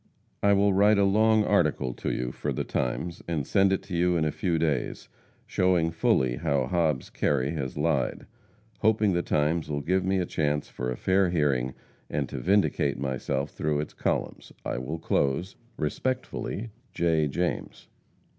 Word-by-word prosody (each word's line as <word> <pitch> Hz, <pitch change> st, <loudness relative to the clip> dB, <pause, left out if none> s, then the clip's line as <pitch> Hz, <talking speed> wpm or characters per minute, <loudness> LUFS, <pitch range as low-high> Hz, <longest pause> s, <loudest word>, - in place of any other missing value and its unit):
I 100 Hz, 0 st, +4 dB
will 100 Hz, 0 st, +3 dB
write 105 Hz, +2 st, +5 dB
a 100 Hz, -, +4 dB
long 110 Hz, +2 st, +4 dB
article 65 Hz, -1 st, +1 dB
to -, -, -3 dB
you 60 Hz, 0 st, -2 dB
for -, -, -3 dB
the -, -, -2 dB
Times, 85 Hz, +7 st, -2 dB
and 80 Hz, -5 st, -1 dB
send 95 Hz, +4 st, +3 dB
it 95 Hz, -, 0 dB
to 90 Hz, -, -6 dB
you 90 Hz, +1 st, +2 dB
in 80 Hz, -, +1 dB
a 75 Hz, -, 0 dB
few 85 Hz, 0 st, -1 dB
days, 75 Hz, -6 st, -1 dB, 0.4 s
showing 90 Hz, -3 st, +2 dB
fully 65 Hz, -6 st, +1 dB
how 70 Hz, -1 st, 0 dB
Hobbs 75 Hz, -2 st, 0 dB
Kerry 70 Hz, -1 st, 0 dB
has 70 Hz, -6 st, -4 dB
lied. 75 Hz, -5 st, 0 dB, 0.5 s
Hoping 105 Hz, -2 st, +3 dB
the 85 Hz, -, +1 dB
Times 75 Hz, 0 st, 0 dB
will 70 Hz, -1 st, -2 dB
give 90 Hz, +5 st, +1 dB
me 95 Hz, +1 st, +1 dB
a 90 Hz, -, 0 dB
chance 75 Hz, -3 st, -1 dB
for 60 Hz, 0 st, -4 dB
a 60 Hz, -, -3 dB
fair 95 Hz, 0 st, +2 dB
hearing 70 Hz, -6 st, 0 dB, 0.3 s
and -, -, -1 dB
to -, -, -5 dB
vindicate 95 Hz, -7 st, +2 dB
myself 70 Hz, +1 st, -2 dB
through 75 Hz, -1 st, -1 dB
its 75 Hz, -, -4 dB
columns, -, -, -2 dB
I -, -, -2 dB
will 70 Hz, +6 st, -4 dB
close, 80 Hz, +3 st, 0 dB, 0.2 s
Respectfully, 115 Hz, -, -3 dB, 0.2 s
J. 80 Hz, -3 st, +2 dB
JAMES. 85 Hz, +5 st, -3 dB
80 Hz, 170 wpm, -27 LUFS, 70-95 Hz, 0.5 s, write